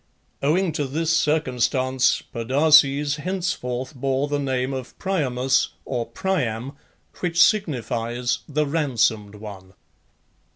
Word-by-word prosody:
Owing 170 Hz, +5 st, +2 dB
to 145 Hz, -2 st, -2 dB
this 160 Hz, +4 st, 0 dB
circumstance 130 Hz, -4 st, +1 dB
Podarces 140 Hz, +3 st, +4 dB
henceforth 155 Hz, -7 st, -3 dB
bore 135 Hz, +1 st, -1 dB
the 145 Hz, 0 st, -1 dB
name 130 Hz, -1 st, -1 dB
of 130 Hz, -1 st, -7 dB
Priamus 135 Hz, -8 st, +1 dB, 0.2 s
(or 120 Hz, -3 st, -3 dB
Priam), 125 Hz, -4 st, -2 dB, 0.5 s
which 175 Hz, -1 st, -1 dB
signifies 125 Hz, -, +1 dB
the 150 Hz, +1 st, +1 dB
"ransomed 120 Hz, -9 st, 0 dB
one." 100 Hz, -3 st, -10 dB
135 Hz, 100 wpm, -23 LUFS, 125-155 Hz, 0.5 s, Podarces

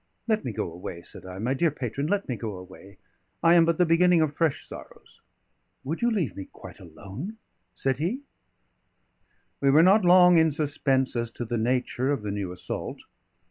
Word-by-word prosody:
"Let 220 Hz, -1 st, +1 dB
me 125 Hz, -, -3 dB
go 95 Hz, -, -4 dB
away," 85 Hz, 0 st, -8 dB
said 95 Hz, -, -11 dB
I. 90 Hz, 0 st, -8 dB
"My 120 Hz, +6 st, -1 dB
dear 165 Hz, +5 st, +2 dB
patron, 140 Hz, 0 st, -4 dB
let 200 Hz, +3 st, -1 dB
me 125 Hz, -, -2 dB
go 110 Hz, -3 st, -5 dB
away; 95 Hz, +2 st, -13 dB, 0.5 s
I 165 Hz, -, +6 dB
am 170 Hz, -1 st, +6 dB
but 165 Hz, -1 st, +1 dB
the 180 Hz, -, +4 dB
beginning 175 Hz, +1 st, +4 dB
of 155 Hz, -2 st, 0 dB
fresh 160 Hz, -1 st, 0 dB
sorrows." -, -, -13 dB, 0.6 s
"Would 155 Hz, +5 st, -4 dB
you 240 Hz, -, +3 dB
leave 170 Hz, -, -1 dB
me 95 Hz, -, -7 dB
quite -, -, -12 dB
alone?" 100 Hz, -, -9 dB, 0.4 s
said 135 Hz, -1 st, -1 dB
he. 195 Hz, -, -2 dB, 1.4 s
We 140 Hz, -, +2 dB
were 150 Hz, +4 st, +6 dB
not 195 Hz, +3 st, +5 dB
long 180 Hz, -1 st, +7 dB
in 160 Hz, -1 st, +3 dB
suspense 140 Hz, -3 st, 0 dB
as 120 Hz, -1 st, -1 dB
to 120 Hz, -, -5 dB
the 120 Hz, +1 st, -3 dB
nature 125 Hz, +3 st, 0 dB
of 135 Hz, -7 st, -2 dB
the 105 Hz, -, -3 dB
new 100 Hz, -3 st, -4 dB
assault. 90 Hz, -, -6 dB
140 Hz, 190 wpm, -26 LUFS, 110-170 Hz, 1.4 s, long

